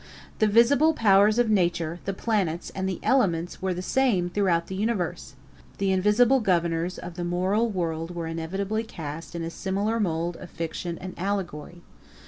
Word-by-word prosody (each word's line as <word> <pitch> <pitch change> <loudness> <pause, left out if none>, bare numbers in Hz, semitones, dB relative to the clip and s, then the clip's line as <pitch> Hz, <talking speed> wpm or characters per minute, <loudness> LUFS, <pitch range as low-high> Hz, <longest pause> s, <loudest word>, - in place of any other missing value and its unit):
The 215 - +4
visible 280 +9 +4
powers 205 -1 +5
of 240 -2 +3
nature, 170 -4 +1
the 195 - -1
planets, 190 -6 -1
and 190 0 -2
the 185 - -4
elements 175 -10 +1
were 190 0 0
the 180 0 -3
same 195 -8 +1
throughout 175 -4 +1
the - - -7
universe. 190 -7 -2 0.4
The 195 -1 +1
invisible 210 +7 +4
governors 170 -4 0
of 175 0 -8
the 175 - -3
moral 185 +6 +1
world 170 -3 -3
were 170 -1 -3
inevitably 190 +7 -2
cast 165 -5 -7
in 170 - -3
a 165 - -4
similar 200 +6 -1
mould 170 -3 -1
of 180 - -10
fiction 170 +1 -4
and 185 0 -7
allegory. 175 -3 -4
185 Hz, 165 wpm, -26 LUFS, 170-210 Hz, 0.4 s, powers